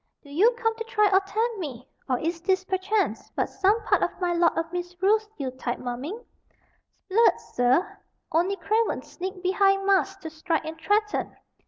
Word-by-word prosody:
"Do 285 - -14
you 375 +11 +5
come 450 -1 0
to 455 - -3
try 425 -2 +2
or 380 - +7
tempt 435 +3 -2
me, 265 -7 -6 0.2
or 255 - +2
is 330 +4 -3
this 375 +1 +1
perchance 390 +3 -1
but - - +1
some 405 +4 +1
part - - +2
of - - -1
my 355 -2 0
Lord 340 -1 +2
of 330 +1 -2
Misrule's 370 +5 0
Yule 265 -3 -3
tide 255 -1 -4
mumming? 255 - -5 0.9
'Sblood, 455 +4 +4
sir; 250 +9 +2 0.3
only 350 +5 +2
cravens 440 +3 0
sneak 375 +1 -6
behind 390 +1 +3
masks 390 0 +2
to 320 - -6
strike 320 +1 -2
and 320 0 -7
threaten. 420 +3 0
375 Hz, 175 wpm, -26 LUFS, 325-415 Hz, 0.9 s, or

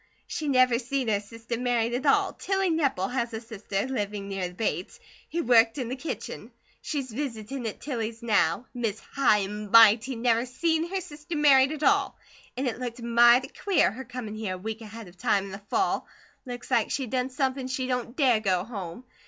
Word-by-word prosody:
She 310 - -4
never 255 -3 +4
seen 265 -1 -2
her 205 -2 +2
sister 230 +3 -6
married 240 -2 0
at 260 +4 -1
all! 275 - +3
Tilly 385 -2 0
Nepple 275 - 0
has 235 -3 -1
a - - -3
sister, 215 -3 -4
living 205 -5 -3
near 195 -2 -2
the 175 - -11
Bates, 185 -3 -3 0.3
who 340 +1 -1
worked 230 0 +5
in 250 -4 -3
the 255 - -2
kitchen. 290 +5 -6 0.3
She's 275 -5 -3
visitin' 240 -1 -4
at 215 - -6
Tilly's 230 -4 -4
now. 210 -2 +2
Miss 225 -4 -2
High 210 -7 +2
and 210 +1 -6
Mighty 230 +3 +6
never 235 +1 +1
seen 325 +6 0
her 385 0 -2
sister 310 -1 -8
married 275 -2 +5
at 310 -1 -5
all! - - +2 0.4
An' 265 - -1
it 245 -2 -2
looked 245 -1 -5
mighty 240 +2 +5
queer, 395 - +2
her 255 +5 -7
comin' 245 -3 -7
here 215 -4 -3
a - - -7
week 220 +4 -5
ahead 220 -1 -9
of 175 +1 -16
time, 195 +1 +1
in 195 - -8
the 195 - -7
fall. 385 0 0 0.4
Looks 245 +1 -7
like 235 -3 +2
she'd 265 -5 -3
done 255 0 0
somepin 260 0 -1
she 260 0 -2
don't 250 -1 -3
DARE 255 -7 +4
go 185 -4 +1
home. 200 -1 -7
240 Hz, 200 wpm, -27 LUFS, 215-265 Hz, 0.4 s, Mighty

